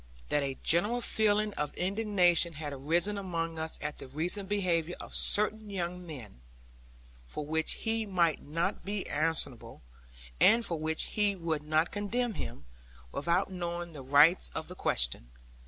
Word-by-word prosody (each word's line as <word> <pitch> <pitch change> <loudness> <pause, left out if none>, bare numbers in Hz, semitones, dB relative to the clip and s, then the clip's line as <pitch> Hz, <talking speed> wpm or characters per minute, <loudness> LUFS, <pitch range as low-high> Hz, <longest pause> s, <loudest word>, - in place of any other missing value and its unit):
That 145 - +2
a 135 -1 -2
general 210 +9 +2
feeling 215 -2 +1
of 150 -4 -3
indignation 180 -3 +2
had 145 -1 -6
arisen 170 +9 0
among 165 -4 -3
us 160 0 -3
at 150 0 -4
the - - -9
recent 175 +8 -2
behaviour 180 -4 0
of - - -9
certain 215 +1 +2
young 180 -2 -4
men, 125 - -10 0.9
for 150 - -5
which 160 +1 0
he 225 -1 -2
might 170 -5 +1
not 165 +4 -2
be 200 0 -4
answerable, 145 - +2 0.6
and 230 +1 +5
for 165 -2 -2
which 160 +1 -1
we 205 -2 +2
would 165 -4 -2
not 155 +2 +1
condemn 225 +4 -1
him, 115 - -7 0.5
without 170 - 0
knowing 175 -1 -4
the 145 - -8
rights 145 +7 +5
of 160 - -4
the 180 - -8
question. - - 0
170 Hz, 155 wpm, -30 LUFS, 155-200 Hz, 0.9 s, and